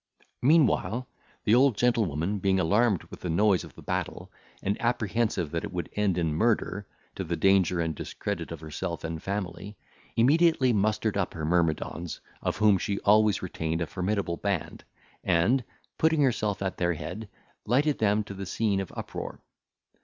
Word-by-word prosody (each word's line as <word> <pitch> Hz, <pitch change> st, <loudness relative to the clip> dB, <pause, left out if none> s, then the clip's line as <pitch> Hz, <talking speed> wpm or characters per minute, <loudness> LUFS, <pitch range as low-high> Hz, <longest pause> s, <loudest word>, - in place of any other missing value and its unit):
Meanwhile, 125 Hz, -, +3 dB, 0.4 s
the 105 Hz, -, +3 dB
old 125 Hz, -2 st, +5 dB
gentlewoman 105 Hz, -6 st, +1 dB
being 95 Hz, 0 st, +2 dB
alarmed 100 Hz, +3 st, +2 dB
with -, -, -9 dB
the 90 Hz, -, -4 dB
noise 95 Hz, +3 st, +3 dB
of -, -, -12 dB
the -, -, -12 dB
battle, -, -, -3 dB, 0.3 s
and 100 Hz, +1 st, -1 dB
apprehensive 110 Hz, -7 st, 0 dB
that 85 Hz, 0 st, -2 dB
it -, -, -5 dB
would 85 Hz, -4 st, -4 dB
end 100 Hz, -4 st, +1 dB
in 80 Hz, -3 st, 0 dB
murder, 105 Hz, +1 st, 0 dB, 0.3 s
to -, -, -4 dB
the 85 Hz, -, -2 dB
danger 95 Hz, 0 st, +3 dB
and 80 Hz, -1 st, 0 dB
discredit 75 Hz, -, -5 dB
of 85 Hz, -2 st, -7 dB
herself 85 Hz, +2 st, -5 dB
and 80 Hz, -1 st, -4 dB
family, 100 Hz, +1 st, -4 dB, 0.4 s
immediately 140 Hz, +1 st, +4 dB
mustered 105 Hz, 0 st, +1 dB
up 100 Hz, -, -1 dB
her 80 Hz, -2 st, -3 dB
myrmidons, 85 Hz, 0 st, 0 dB, 0.2 s
of -, -, -1 dB
whom 105 Hz, -3 st, +4 dB
she 100 Hz, 0 st, -2 dB
always 105 Hz, -1 st, +4 dB
retained 80 Hz, -2 st, -2 dB
a -, -, +1 dB
formidable 90 Hz, 0 st, -2 dB
band, 100 Hz, -5 st, -3 dB, 0.4 s
and, 95 Hz, +9 st, +3 dB, 0.4 s
putting 160 Hz, -2 st, +3 dB
herself 105 Hz, -6 st, 0 dB
at 95 Hz, -, -3 dB
their 85 Hz, -1 st, +1 dB
head, 100 Hz, +7 st, -6 dB, 0.4 s
lighted 140 Hz, +6 st, +2 dB
them 105 Hz, 0 st, +2 dB
to 100 Hz, -, -8 dB
the 95 Hz, -1 st, -6 dB
scene 100 Hz, 0 st, 0 dB
of 95 Hz, -, -4 dB
uproar. -, -, -6 dB
100 Hz, 165 wpm, -28 LUFS, 85-110 Hz, 0.4 s, old